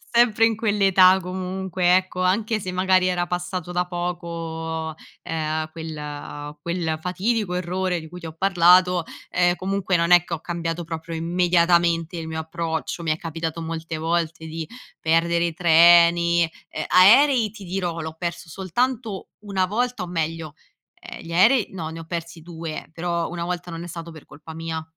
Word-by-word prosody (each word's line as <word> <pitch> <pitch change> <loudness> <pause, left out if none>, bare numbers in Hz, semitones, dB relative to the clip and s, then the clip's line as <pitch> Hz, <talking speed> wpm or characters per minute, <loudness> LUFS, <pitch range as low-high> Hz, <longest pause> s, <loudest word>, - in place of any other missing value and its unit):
sempre 225 -2 +5
in 225 -1 +1
quell'età 195 -4 +4
comunque, 185 0 0
ecco, 185 -1 -1
anche 215 +4 +1
se 185 -1 -5
magari 185 0 +3
era 175 -1 0
passato 180 0 -4
da 180 0 0
poco, 165 -2 -4 0.3
ehm, 155 -1 -2
quel 150 -2 -7
quel 170 -2 -2
fatidico 190 +3 -1
errore 180 0 -1
di 160 - -10
cui 180 +1 -9
ti 165 - -10
ho 160 - -7
parlato, 180 -1 +4 0.3
ehm, 175 0 +2
comunque 195 0 -1
non 170 +1 +1
è 175 -1 +7
che 175 - -6
ho 165 - -2
cambiato 170 0 -3
proprio 165 0 -6
immediatamente 170 0 +2
il 160 - -5
mio 160 0 -4
approccio. 160 +1 -4
Mi 160 - 0
è 155 - 0
capitato 165 0 -4
molte 160 0 -5
volte 165 0 -1
di 160 0 -5 0.3
perdere 170 +1 +2
i 170 - -2
treni, 170 +1 +5 0.3
e - - -4
aerei, 225 +5 +6
ti 205 -2 -11
dirò, 175 -2 -3
l'ho 160 0 -6
perso 170 -1 -5
soltanto 215 - -2
1 195 -3 -1
volta 240 0 -1
o 180 - -6
meglio 165 -2 -3 0.5
ehm, - - -9
gli 165 - -10
aerei 215 +6 +4
no, 170 -4 -5
ne 165 +1 -8
ho - - -7
persi 170 -1 -6
2 165 -2 -7
però 170 0 -2
1 170 -1 -4
volta 175 -1 -4
non 165 +1 -6
è - - -7
stato 170 0 -8
per 155 -2 -13
colpa 150 +3 -12
mia. 160 0 -4
170 Hz, 170 wpm, -23 LUFS, 165-185 Hz, 0.5 s, è